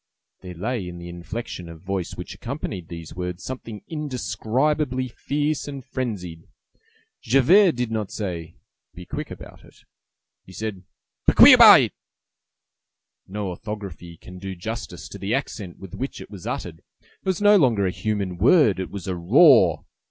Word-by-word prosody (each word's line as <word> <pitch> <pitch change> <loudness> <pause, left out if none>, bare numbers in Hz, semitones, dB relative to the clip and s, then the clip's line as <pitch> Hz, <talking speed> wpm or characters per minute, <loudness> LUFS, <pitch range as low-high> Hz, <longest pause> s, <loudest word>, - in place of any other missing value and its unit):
There 90 -1 -9
lay 105 +2 -3
in 90 0 -8
the 85 0 -9
inflection 85 +1 -7
of 80 -1 -12
voice 95 -2 -3
which 90 - -7
accompanied 115 - -6
these 85 -2 -9
words 90 0 -5
something 115 -5 -7
indescribably 130 -2 -1
fierce 145 +5 -2
and 140 -3 -7
frenzied. 95 -12 -5 0.7
Javert 160 - +5
did 125 -2 -3
not 110 -3 -2
say, 85 -5 -5 0.4
"Be 90 0 -10
quick - - -5
about - - -11
it!" - - -19 0.7
he 95 - -15
said 105 -2 -5 0.5
"Bequiabouit." - - +9 1.4
No 100 0 -4
orthography 90 -4 -7
can 90 +2 -12
do 95 0 -6
justice 110 +7 -6
to - - -10
the 100 +5 -1
accent 105 -9 -5
with 95 -3 -12
which 135 - -5
it - - -11
was 95 -4 -9
uttered: 80 -2 -4
it - - -38 0.2
was 190 -2 -1
no 205 0 +6
longer 120 - +3
a 90 - 0
human 100 -4 -3
word: 120 - +5
it 95 - -4
was 100 -4 -7
a 95 - -2
roar. 95 - +5
105 Hz, 150 wpm, -23 LUFS, 90-130 Hz, 1.4 s, Bequiabouit